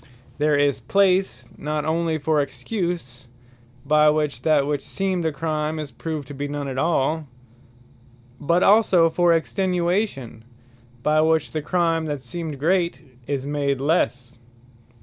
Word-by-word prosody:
There 150 0 +3
is 140 -2 +1
place, 185 - +1
not 150 0 -2
only 160 0 0
for 155 0 +1
EXCUSE, 165 - -4 0.6
by 150 +1 +5
which 150 -1 -1
that 150 -3 +3
which 145 0 -1
seemed 190 -2 -2
a 160 - +1
Crime, 155 +1 -2
is 150 -3 -5
proved 150 +3 -5
to - - -7
be 140 +1 -4
none 145 -1 -4
at 130 -1 -3
all; 155 0 0 1.1
but 170 +5 +2
also 195 -6 +5
for 175 +1 +3
EXTENUATION, 175 - -1 0.6
by 155 +1 +3
which 160 -1 +1
the 155 - -2
Crime, 165 0 0
that 145 -4 -4
seemed 155 +3 -6
great, 170 +4 +1 0.3
is 140 -2 -2
made 140 -2 -1
lesse. 125 -5 -1
155 Hz, 140 wpm, -23 LUFS, 145-170 Hz, 1.1 s, by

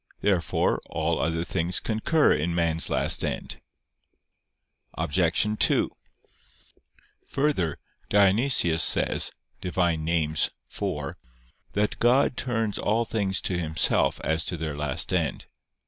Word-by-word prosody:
Therefore 95 -4 +1
all - - -1
other 80 0 0
things 85 +1 0
concur 120 +8 +2
in 85 +3 -1
man's 85 -1 +1
last - - +1
end. - - -4 1.3
Obj. 85 +2 +2 0.2
2: - - +4 1.4
Further, 135 - 0 0.3
Dionysius 100 -4 +3
says - - 0 0.3
(Div. 90 - -6
Nom. 85 -3 +1
iv) 80 -2 +1 1.2
that 105 +1 -1
"God 125 +2 +3
turns 115 -5 -2
all 115 +3 +1
things 100 -4 -1
to 90 -2 -1
Himself 80 -2 +1
as 80 +1 0
to 85 - -2
their 80 -2 -4
last 75 -2 0
end." - - -1
90 Hz, 110 wpm, -26 LUFS, 80-110 Hz, 1.4 s, 2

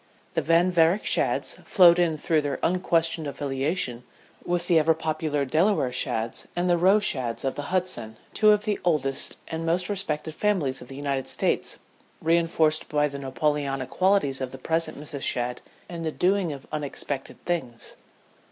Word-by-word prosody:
The - - +1
Van 170 +3 +3
Varick 175 +3 +3
Shadds - - +1
flowed 180 -3 +6
in 165 -3 +2
through 155 +1 +1
their 145 -2 -2
unquestioned 165 -3 +1
affiliation 135 -2 -2 0.4
with 175 0 -1
the 170 -2 +4
ever 160 +1 +3
popular 155 -2 -1
Delaware 155 -1 +2
Shadds 115 -2 -2
and 175 +1 0
the 175 -1 +3
Roe 190 +4 +5
Shadds 130 - -2
of 135 - 0
the 145 0 -6
Hudson, 150 -13 -2 0.2
two 215 - +4
of 210 0 +4
the 210 -2 0
oldest 140 -6 0
and 160 0 -4
most 175 +3 0
respected 160 -6 -2
families 165 -10 0
of 125 - -10
the 135 - -9
United 140 -1 -2
States, - - 0 0.4
reinforced 165 -1 +2
by 150 0 +2
the 140 -1 -7
Napoleonic 135 0 -1
qualities 185 -9 +2
of 130 -1 -3
the 130 - -8
present 160 +2 -1
Mrs. 145 -1 -7
Shadd 125 -1 -1 0.3
in 170 -1 -6
the 160 -1 -2
doing 185 0 +1
of 140 -2 -8
unexpected 145 -2 -4
things. 130 -10 -3
155 Hz, 165 wpm, -26 LUFS, 135-175 Hz, 0.4 s, flowed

